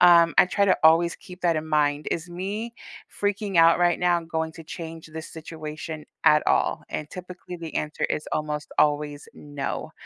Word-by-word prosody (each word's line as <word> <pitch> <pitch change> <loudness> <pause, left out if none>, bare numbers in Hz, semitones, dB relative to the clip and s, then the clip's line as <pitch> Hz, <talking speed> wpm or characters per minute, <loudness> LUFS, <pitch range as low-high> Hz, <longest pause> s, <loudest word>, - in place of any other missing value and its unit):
um, 170 -1 +7
I - - +7
try 200 +3 +2
to 190 - +4
always 165 +2 +5
keep 180 -1 -13
that 170 -2 +3
in 155 0 -3
mind, 150 -1 +1
"Is 165 +2 -2
me 200 +7 -4 0.4
freaking 205 -1 -2
out 165 0 +7
right 175 -1 +3
now 175 -1 +2
going 160 -1 -3
to 165 0 -11
change 165 0 -8
this 160 0 -8
situation 155 -1 -7 0.2
at 150 0 +6
all?" - - +2
And 150 - -4
typically, 180 0 -8
the 165 -2 -8
answer 150 +1 -2
is 150 - -1
almost 150 -1 -3
always, 145 -1 +1
"No," 145 -2 -5
165 Hz, 180 wpm, -25 LUFS, 155-175 Hz, 0.4 s, um